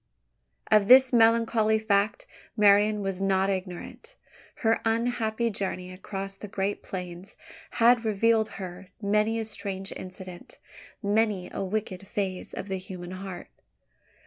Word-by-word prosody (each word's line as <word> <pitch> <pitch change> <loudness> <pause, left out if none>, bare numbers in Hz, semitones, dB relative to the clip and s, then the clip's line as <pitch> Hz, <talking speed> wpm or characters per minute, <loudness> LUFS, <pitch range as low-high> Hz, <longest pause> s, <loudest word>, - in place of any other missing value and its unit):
Of 210 -2 +5
this 260 +1 +7
melancholy 225 -1 +4
fact 205 -1 +1 0.3
Marian 210 0 +5
was 195 -1 -3
not 195 0 +2
ignorant. 190 - -6 0.5
Her 225 0 +3
unhappy 230 0 0
journey 185 -2 -3
across 195 +1 -6
the 210 - -9
great 195 +1 -2
plains 180 0 -7 0.4
had 235 0 +4
revealed 220 +1 +2
to - - -17
her 185 0 -8
many 210 +2 +1
a 225 - -2
strange 195 -2 -4
incident 185 -1 -9 0.5
many 205 -2 +1
a - - -2
wicked 195 -1 -4
phase 190 -3 -3
of - - -6
the 190 -1 -2
human 185 -1 -8
heart. 185 -1 -7
200 Hz, 130 wpm, -27 LUFS, 190-220 Hz, 0.5 s, this